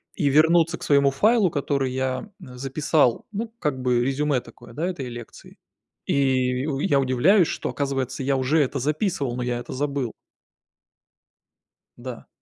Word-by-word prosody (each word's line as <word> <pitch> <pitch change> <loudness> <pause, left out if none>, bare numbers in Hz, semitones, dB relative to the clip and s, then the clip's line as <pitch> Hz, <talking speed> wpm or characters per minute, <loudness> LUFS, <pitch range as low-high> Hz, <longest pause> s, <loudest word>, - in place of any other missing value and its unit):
и 145 -6 +1
вернуться 165 +3 +4
к - - -11
своему 140 -1 +4
файлу, 205 - +3
который 140 -2 -1
я, 130 +7 -2
м, 125 -1 -11
записал. 135 -1 +1
Ну, 225 +2 -4
как 135 -4 -2
бы 125 -1 +2
резюме 140 0 +1
такое, 120 -1 -15
да, 160 +8 -2
этой 145 -9 -4
лекции. 120 -2 -11 0.5
И 130 -2 +1
у 135 -3 -2
я 140 -1 +2
удивляюсь, 145 - +4
что, - - -3
оказывается, 135 -2 -2
я 135 0 +1
уже 130 +5 +2
это 140 0 -1
записывал, 150 - -1
но 125 - -3
я 120 -1 -2
это 120 - -7
забыл. 140 -3 -2 1.9
Да. 120 -1 -8
135 Hz, 155 wpm, -24 LUFS, 130-150 Hz, 1.9 s, вернуться